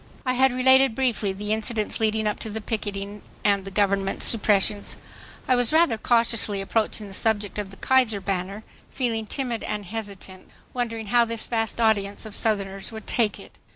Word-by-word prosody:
I 255 - +2
had 265 +1 +4
related 260 -1 +5
briefly 235 -6 +1
the 205 +2 -2
incidents 220 0 -1
leading 220 0 +1
up 210 - -1
to 220 - -5
the 220 +1 -3
picketing 205 -2 -4 0.2
and 200 -2 +3
the - - -5
Government's 195 -1 +1
suppressions. 205 -2 +2 0.5
I 255 - +4
was 245 -2 +2
rather 315 -6 +4
cautiously 230 -3 +2
approaching 215 +1 -1
the 195 - -10
subject 210 0 -1
of 205 -2 -4
the 195 - -13
"Kaiser 250 -6 +2
banner," 195 +2 -3 0.3
feeling 225 -4 -2
timid 245 -2 -3
and 210 -1 -3
hesitant, 200 -2 -8 0.2
wondering 230 -3 -3
how 240 -1 +6
this 230 -1 -4
vast 225 -1 -2
audience 205 -2 +1
of 215 - -8
Southerners 195 -3 -2
would 220 -1 -8
take 220 -4 +1
it. - - -13
215 Hz, 175 wpm, -25 LUFS, 200-230 Hz, 0.5 s, how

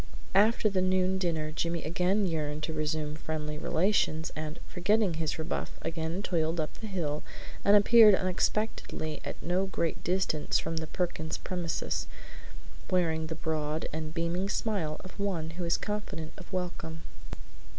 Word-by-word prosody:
After 215 +3 +5
the 195 -3 +2
noon 185 0 +2
dinner 160 -4 0
Jimmy 170 +2 -1
again 180 +5 +2
yearned 155 -3 -2
to 160 - -1
resume 155 0 -1
friendly 150 -1 -3
relations, 160 -3 +1
and, 155 0 -4
forgetting 205 +1 +2
his 160 -1 -1
rebuff, 160 0 -3
again 165 +3 -2
toiled 165 -2 +1
up 155 - -1
the 220 - -5
hill 155 -7 -1 0.4
and 200 - +7
appeared 210 0 +8
unexpectedly 185 -4 -1
at - - -5
no 180 +3 +1
great 170 -4 -1
distance 180 -4 +1
from 165 - -2
the 160 0 -2
Perkins 160 -3 -2
premises, 175 -3 -2 0.8
wearing 160 -4 +1
the 160 - -4
broad 155 -1 -1
and 155 0 -3
beaming 170 +3 -1
smile 190 -10 -1
of 185 - -11
one 175 -6 -1
who 175 +1 -4
is 170 - +2
confident 210 -7 -4
of 185 - -12
welcome. 175 -3 -4
170 Hz, 150 wpm, -30 LUFS, 155-190 Hz, 0.8 s, appeared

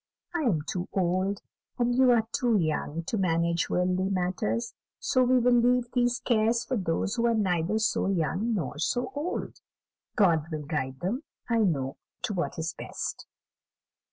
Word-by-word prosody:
I 345 - 0
am 205 - +1
too 180 +3 -4
old, 185 +2 0 0.3
and 245 0 +2
you 260 +1 +5
are 230 -2 +4
too 240 -3 +2
young, 160 -1 -1
to 210 +5 -2
manage 170 -1 +1
worldly 185 +1 +1
matters; 180 - -1 0.2
so 255 - +1
we 255 0 +4
will 250 0 +4
leave 245 0 +3
these 245 -1 +2
cares 230 0 +1
to 260 - +1
those 185 +1 -1
who 235 0 +2
are 230 - +2
neither 185 -1 +1
so 220 -2 +1
young 195 +5 0
nor 150 -5 -3
so 245 +10 0
old; 310 +7 -4 0.6
God 170 -8 +3
will 155 -2 -4
guide 130 -3 -3
them, 215 +10 -1 0.3
I 230 -1 +2
know, 140 -10 0 0.3
to 235 -4 -1
what 180 -2 -2
is 165 +1 -2
best." - - -5
195 Hz, 165 wpm, -28 LUFS, 170-240 Hz, 0.6 s, you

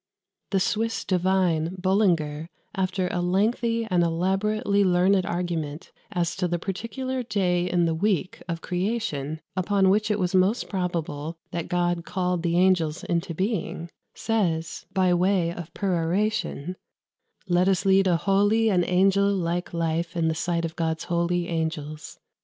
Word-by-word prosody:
The 195 - +1
Swiss 225 +4 -1
divine 180 -2 +1
Bullinger, 170 -5 +1 0.2
after 185 -1 -1
a 175 - -1
lengthy 225 +5 +1
and 180 -5 +1
elaborately 195 +4 +1
learned 185 +1 +3
argument 165 -3 -3 0.2
as 175 -3 -1
to 180 -2 0
the 175 0 -1
particular 230 +8 -4
day 180 -6 0
in 175 -1 +2
the 165 - +1
week 185 +1 -1
of 165 0 -3
creation 175 -6 -2
upon 190 0 +2
which 210 +2 +2
it 210 - +1
was 180 -2 -1
most 190 +5 +2
probable 170 -4 -3
that 170 -1 -3
God 175 -1 0
called 180 -1 -1
the 170 0 0
angels 180 -4 +2
into 170 0 -2
being, 185 -3 -2 0.2
says, 170 -8 -1
by 185 -2 +2
way 175 -1 +2
of 170 -1 -8
peroration, 185 -1 -1 0.7
"Let 180 +1 +3
us 190 0 +1
lead 195 0 +4
a 175 -2 +3
holy 205 +5 +3
and 180 -2 +3
angel 195 +3 +3
like 175 -2 -1
life 165 +1 -2
in 165 -1 +2
the - - +1
sight 170 +1 -1
of 165 0 -5
God's 160 -1 -1
holy 175 0 0
angels. 160 -2 -4
180 Hz, 145 wpm, -25 LUFS, 170-195 Hz, 0.7 s, lead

